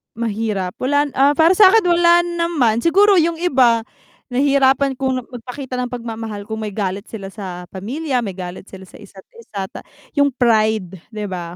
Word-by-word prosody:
Mahirap 215 Hz, -5 st, -3 dB
wala, 285 Hz, +2 st, +1 dB
ah, 280 Hz, +2 st, +5 dB
para 325 Hz, +2 st, +5 dB
sa'kin 395 Hz, +2 st, +6 dB
wala 345 Hz, 0 st, +4 dB
naman, 335 Hz, -10 st, 0 dB
siguro 390 Hz, +5 st, +4 dB
yung 330 Hz, +1 st, +1 dB
iba 255 Hz, -9 st, +3 dB, 0.5 s
nahihirapan 275 Hz, +1 st, +3 dB
kung 260 Hz, -2 st, -1 dB
magpakita 250 Hz, +1 st, -7 dB
ng 250 Hz, -, -1 dB
pagmamahal 225 Hz, -3 st, -6 dB
kung 220 Hz, +1 st, -6 dB
may 210 Hz, -1 st, -4 dB
galit 195 Hz, 0 st, -4 dB
sila 195 Hz, -3 st, -8 dB
sa 185 Hz, -4 st, -7 dB
pamilya, 255 Hz, +8 st, -3 dB
may 195 Hz, -4 st, -5 dB
galit 180 Hz, +1 st, -8 dB
sila 190 Hz, -1 st, -11 dB
sa -, -, -15 dB
isa't 195 Hz, -2 st, -14 dB, 0.2 s
isa 200 Hz, -, -6 dB
ta -, -, -8 dB, 0.4 s
yung 285 Hz, -1 st, +3 dB
pride 215 Hz, -6 st, +1 dB
'di 210 Hz, -1 st, -5 dB
ba. 175 Hz, -1 st, -6 dB
235 Hz, 165 wpm, -19 LUFS, 205-285 Hz, 0.5 s, sa'kin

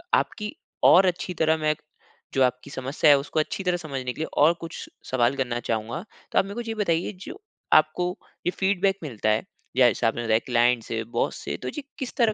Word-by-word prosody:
आपकी 210 Hz, -1 st, -2 dB, 0.3 s
और 190 Hz, +2 st, +8 dB
अच्छी 180 Hz, 0 st, -1 dB
तरह 160 Hz, -1 st, +2 dB
मैं 155 Hz, 0 st, +1 dB, 0.6 s
जो 135 Hz, -1 st, +4 dB
आपकी 125 Hz, +2 st, -1 dB
समस्या 135 Hz, +4 st, +1 dB
है 140 Hz, -, +7 dB
उसको 145 Hz, +3 st, -2 dB
अच्छी 190 Hz, +5 st, -2 dB
तरह 180 Hz, -1 st, +1 dB
समझने 135 Hz, -6 st, -4 dB
के -, -, -13 dB
लिए -, -, -1 dB
और 155 Hz, +4 st, +6 dB
कुछ 165 Hz, -, -7 dB, 0.2 s
सवाल 125 Hz, +1 st, +2 dB
करना 120 Hz, -3 st, -1 dB
चाहूँगा। 115 Hz, 0 st, -3 dB, 0.3 s
तो -, -, +4 dB
आप -, -, +2 dB
मेरे 200 Hz, +2 st, -7 dB
को 240 Hz, -, -3 dB
ये 225 Hz, -, -1 dB
बताइए 175 Hz, -3 st, 0 dB
जो -, -, -9 dB, 0.3 s
आपको 155 Hz, +3 st, +4 dB, 0.4 s
ये -, -, +3 dB
फ़ीडबैक 195 Hz, 0 st, +1 dB
मिलता 110 Hz, -7 st, -2 dB
है, 110 Hz, +1 st, +2 dB, 0.3 s
जैसे 120 Hz, -2 st, +4 dB
आपने 120 Hz, +1 st, -1 dB
बताया 110 Hz, -1 st, +3 dB
क्लाइंट 120 Hz, -1 st, +3 dB
से, 115 Hz, -1 st, -3 dB
बॉस 115 Hz, -, -1 dB
से, -, -, -2 dB
तो -, -, -7 dB
ये 295 Hz, -, -5 dB, 0.2 s
किस 265 Hz, -, -4 dB
तरह 225 Hz, -3 st, +3 dB
150 Hz, 210 wpm, -25 LUFS, 120-180 Hz, 0.6 s, और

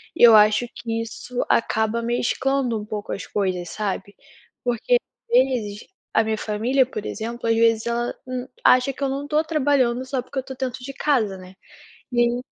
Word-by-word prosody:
e -, -, +2 dB
eu 230 Hz, -2 st, +10 dB
acho 215 Hz, +3 st, +5 dB
que 225 Hz, -1 st, -3 dB
isso 245 Hz, +2 st, -5 dB
acaba 220 Hz, 0 st, +1 dB
mesclando 240 Hz, +1 st, 0 dB
um -, -, -6 dB
pouco 210 Hz, -1 st, -5 dB
as -, -, -5 dB
coisas, 185 Hz, -4 st, -2 dB
sabe, 200 Hz, -1 st, -4 dB, 0.5 s
porque, 245 Hz, -, +1 dB
as 485 Hz, -, -5 dB
vezes 235 Hz, -6 st, 0 dB, 0.2 s
a 225 Hz, -, +3 dB
minha 220 Hz, 0 st, -1 dB
família, 230 Hz, +6 st, +1 dB
por 215 Hz, -5 st, -6 dB
exemplo, 230 Hz, +1 st, -4 dB
às 225 Hz, -, +3 dB
vezes 225 Hz, -1 st, +3 dB
ela 235 Hz, 0 st, -1 dB
n 255 Hz, 0 st, -4 dB, 0.2 s
acha 255 Hz, +2 st, +5 dB
que 280 Hz, -, -6 dB
eu 275 Hz, -, +1 dB
não 280 Hz, +2 st, -3 dB
estou 305 Hz, +2 st, +1 dB
trabalhando, 275 Hz, -6 st, +1 dB
só 260 Hz, 0 st, -2 dB
porque 270 Hz, -, -4 dB
eu -, -, -1 dB
estou 265 Hz, 0 st, -9 dB
dentro 255 Hz, -1 st, -4 dB
de 275 Hz, +2 st, -6 dB
casa, 240 Hz, -10 st, +1 dB
né. 185 Hz, 0 st, -13 dB, 0.6 s
E 240 Hz, -, 0 dB
aí 240 Hz, +1 st, +1 dB
240 Hz, 190 wpm, -23 LUFS, 220-260 Hz, 0.6 s, eu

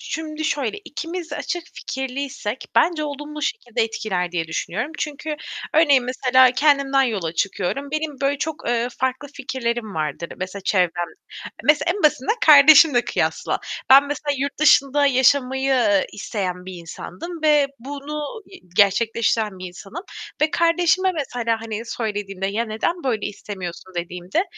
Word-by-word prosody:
şimdi 315 Hz, -1 st, -5 dB
şöyle, 285 Hz, -, -1 dB
ikimiz 335 Hz, +1 st, -6 dB
de 295 Hz, -, -4 dB
açık 350 Hz, 0 st, -3 dB
fikirliysek 265 Hz, -3 st, -4 dB
bence 325 Hz, -3 st, +3 dB
olumlu 295 Hz, +1 st, -6 dB
şekilde 240 Hz, -, -1 dB
etkiler 195 Hz, -6 st, -2 dB
diye 170 Hz, -2 st, -1 dB
düşünüyorum. 205 Hz, -, -3 dB
Çünkü 300 Hz, +1 st, -4 dB, 0.4 s
örneğin 285 Hz, -5 st, +5 dB
mesela 255 Hz, 0 st, +4 dB
kendimden 275 Hz, -1 st, +3 dB
yola 200 Hz, -10 st, -1 dB
çıkıyorum; 200 Hz, -, -2 dB
benim 305 Hz, -2 st, -3 dB
böyle 280 Hz, +1 st, +1 dB
çok, 315 Hz, +1 st, -4 dB
ııı, 240 Hz, 0 st, +1 dB
farklı 260 Hz, +2 st, -2 dB
fikirlerim 240 Hz, -5 st, -3 dB
vardır, 155 Hz, +2 st, -3 dB
mesela 185 Hz, +2 st, -5 dB
çevrem 175 Hz, -3 st, +1 dB, 0.6 s
mesela 300 Hz, +5 st, +3 dB
en 410 Hz, -, -5 dB
basitinden 300 Hz, -, +3 dB
kardeşimle 290 Hz, -3 st, +8 dB
kıyasla. -, -, -1 dB, 0.3 s
Ben 275 Hz, +2 st, +8 dB
mesela 290 Hz, 0 st, -2 dB
yurt 280 Hz, +1 st, -3 dB
dışında 290 Hz, -1 st, +5 dB
yaşamayı, 265 Hz, 0 st, +3 dB
ııı, 205 Hz, -6 st, +3 dB
isteyen 185 Hz, -4 st, -4 dB
bir 185 Hz, -, -7 dB
insandım 180 Hz, -, -8 dB
ve 295 Hz, -2 st, +4 dB
bunu 290 Hz, -, -6 dB
y 385 Hz, -, -14 dB, 0.2 s
gerçekleştiren 215 Hz, 0 st, +2 dB
bir 185 Hz, -, -6 dB
insanım 195 Hz, -, -9 dB, 0.4 s
ve 305 Hz, 0 st, +3 dB
kardeşime 350 Hz, +2 st, +2 dB
mesela, 245 Hz, -8 st, -2 dB
hani, 225 Hz, -1 st, -4 dB
söylediğimde, 205 Hz, -4 st, -3 dB
"Ya 215 Hz, +4 st, -1 dB
neden 230 Hz, +11 st, -2 dB
böyle 235 Hz, -6 st, -1 dB
istemiyorsun?" 190 Hz, -3 st, -8 dB
dediğimde 180 Hz, -, -2 dB
260 Hz, 140 wpm, -22 LUFS, 205-300 Hz, 0.6 s, kardeşimle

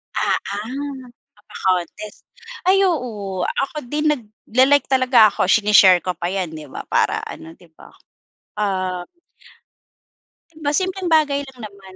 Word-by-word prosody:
Ah, -, -, +1 dB
ah, 260 Hz, +6 st, -6 dB, 0.3 s
pa 205 Hz, -, -25 dB
pa-contest. 185 Hz, +3 st, -3 dB, 0.4 s
Ay 390 Hz, +1 st, +5 dB
oo, 215 Hz, -, -2 dB
ako 275 Hz, -, -3 dB
din 300 Hz, +3 st, -2 dB
nagla-like 260 Hz, +3 st, +1 dB
talaga 255 Hz, -5 st, +5 dB
ako. -, -, -1 dB
Sine-share 195 Hz, -3 st, +5 dB
ko 180 Hz, -, -1 dB
pa 175 Hz, -, -3 dB
'yan, 185 Hz, -2 st, -3 dB
'di 155 Hz, -2 st, -9 dB
ba -, -, -8 dB
para -, -, +1 dB
ano, 165 Hz, +1 st, -9 dB
'di 175 Hz, -, -20 dB
ba. -, -, -15 dB, 0.7 s
Ah. 185 Hz, -3 st, -2 dB, 1.5 s
'Di 315 Hz, -, -17 dB
ba 290 Hz, -, +2 dB
simpleng 375 Hz, -2 st, -2 dB
bagay 290 Hz, -3 st, +2 dB
lang 260 Hz, -2 st, -15 dB
naman. 195 Hz, -2 st, -13 dB
215 Hz, 140 wpm, -20 LUFS, 190-280 Hz, 1.5 s, Ay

